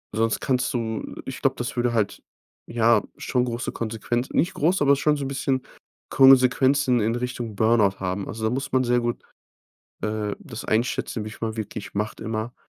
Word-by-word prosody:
sonst 115 0 +1
kannst 125 -2 0
du 115 -3 -2 0.2
ich 130 - -6
glaube, 135 -1 +2
das 120 - -4
würde 120 -1 +1
halt 105 -4 -1 0.4
ja 115 -2 +3 0.2
schon 125 -1 0
große 120 0 -3
Konsequenzen 115 +2 -3
nicht 175 +4 +2
groß, 175 +4 +1
aber 140 0 +5
schon 150 +2 +2
so 140 - -3
'n - - -2
bisschen 135 -1 -1 0.5
Konsequenzen 130 0 +5
in 115 +2 +1
Richtung 120 -3 -4
Burnout 110 -2 +3
haben. 95 +1 -3
Also, 110 0 -6
da - - +2
muss 135 +5 -3
man 130 0 +3
sehr 120 0 +2
gut, 120 0 -3 0.8
äh, 105 -1 -2
das 120 -5 -8
einschätzen, 115 0 -1
wie - - -5
viel - - -12
man 110 0 -3
wirklich 105 -2 -6
macht 105 +1 -3
immer. 110 +2 -4
120 Hz, 185 wpm, -24 LUFS, 110-130 Hz, 0.8 s, aber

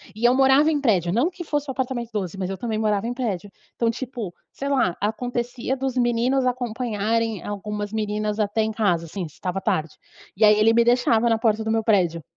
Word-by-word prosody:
E 225 - -2
eu 245 - +6
morava 270 +4 +5
em 290 -2 0
prédio, 180 - +2
não 260 +10 +2
que 355 -1 -8
fosse 295 -2 -2
o - - 0
apartamento 250 -3 -3
12, 195 -3 -3
mas 190 -1 -3
eu 195 - -4
também 220 -3 -3
morava 210 -1 +1
em 245 - -2
prédio. 205 -6 -3 0.2
Então, 230 -1 +1
tipo, 235 -6 -6 0.2
sei 275 - -5
lá, 255 -11 +1
acontecia 245 +4 -2
dos 265 -1 -2
meninos 245 +2 +2
acompanharem 230 -3 -1
algumas 205 +1 -5
meninas 210 0 -2
até 210 +1 +1
em 220 - -1
casa, 190 -7 +1
assim, 175 +1 -5
se - - -21
estava 190 +1 -3
tarde. 160 -7 -1 0.4
E 215 - +1
aí 210 0 +6
ele 225 +1 +5
me 235 0 +5
deixava 240 -1 +3
na 225 - +3
porta 220 -1 +1
do 220 - -3
meu 225 0 +1
prédio. 175 -7 +2
225 Hz, 215 wpm, -23 LUFS, 205-245 Hz, 0.4 s, eu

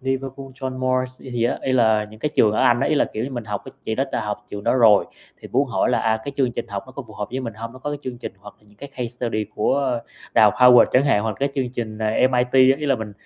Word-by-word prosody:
Liverpool 135 +1 -4
John 130 -1 -6
Moores 130 0 -1
gì 130 - -10
gì 120 -1 -1
á, 120 - 0
ý 130 - -1
là 110 -4 +3
những 110 +1 -14
cái 150 - 0
trường 105 -1 +5
ở - - 0
Anh 120 0 +4
á, - - +1
ý - - +2
là, 145 - +3
kiểu 110 +3 -3
như, 135 - -5
mình 120 -3 -5
học 105 -2 -5 0.2
chị 110 - -2
đó 135 +4 0
đã - - 0
học 105 0 -5
trường 100 0 -7
đó - - +2
rồi, 110 -5 +5 0.3
thì - - -10
muốn - - +1
hỏi - - +1
là, - - +2
à, 110 0 +1
cái 140 - -5
chương 130 -4 +1
trình - - -4
học 100 -1 -4
nó 130 - -13
có 140 - -7
phù 110 - -14
hợp 105 -1 -5
với 130 +2 -3
mình 115 -4 -5
hông? 115 +1 -7
Nó 130 - -12
có 145 +3 -5
cái 145 - -4
chương 125 -2 -6
trình - - -7
hoặc 105 +1 -13
là - - -32
những 105 - -23
cái 140 - -9
case 125 -3 -4
study 115 -2 -3
của 125 +2 0 0.3
Đại - - +6
học 105 - +4
Howard 125 -1 +8
chẳng 130 +3 +4
hạn 105 -7 +2
hoặc 110 - -1
là 105 - -7
cái 140 - +2
chương 130 -3 -1
trình 110 -3 -5
MIT, 125 +3 +1 0.2
giống 135 - +2
như 150 - -3
là 140 - +3
mình 110 -4 -6
125 Hz, 315 wpm, -22 LUFS, 110-130 Hz, 0.3 s, Howard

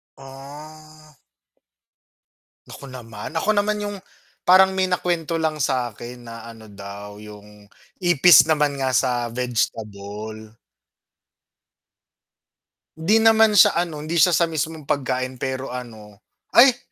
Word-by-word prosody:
Ah. 150 +3 -14 1.5
Nako - - -12
naman, 115 -5 -9
ako 180 - -2
naman 210 0 0
yung 205 -1 -5 0.5
parang 190 +1 +6
may 190 0 0
nakwento 170 -2 -2
lang 160 -1 -2
sakin 120 -2 -4
na, 115 0 -10
ano 115 -1 -13
daw 100 +1 -10
yung 105 -1 -14 0.3
ipis 175 -2 +6
naman 150 -3 0
nga 130 -1 -1
sa 120 -1 0
vegetable. 110 -2 -5 2.4
'Di 165 +8 +2
naman 220 -1 +4
siya - - +6
ano, 170 -3 -2
hindi 155 +3 -5
siya 170 +2 +4
sa 170 0 +3
mismong 160 -1 -5
pagkain 130 -2 -2
pero 130 0 -4
ano, 110 -5 -10 0.3
ay! 245 0 +7
135 Hz, 115 wpm, -21 LUFS, 115-165 Hz, 2.4 s, ay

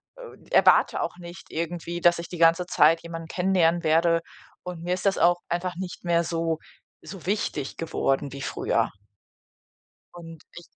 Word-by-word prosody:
äh, - - -13
erwarte - - +4
auch - - -4
nicht, 175 0 -11
irgendwie, 170 +1 -4
dass 175 0 +4
ich 170 - -7
die 175 - -7
ganze 165 +2 +4
Zeit 165 0 +4
jemanden 165 -1 -7
kennenlernen 175 -2 +1
werde, 165 +1 +3 0.4
und 175 -2 -7
mir 180 +1 -1
ist 185 +2 -1
das 195 - +2
auch 175 +1 +4
einfach 175 +1 -2
nicht 185 -1 -7
mehr 170 0 +2
so 165 -1 -2 0.4
so 190 -4 -10
wichtig 175 -8 -2
geworden 140 -4 -1
wie 140 - -7
früher. - - -1 1.2
Und 165 -2 -11
ich 175 - -9
170 Hz, 160 wpm, -25 LUFS, 165-180 Hz, 1.2 s, erwarte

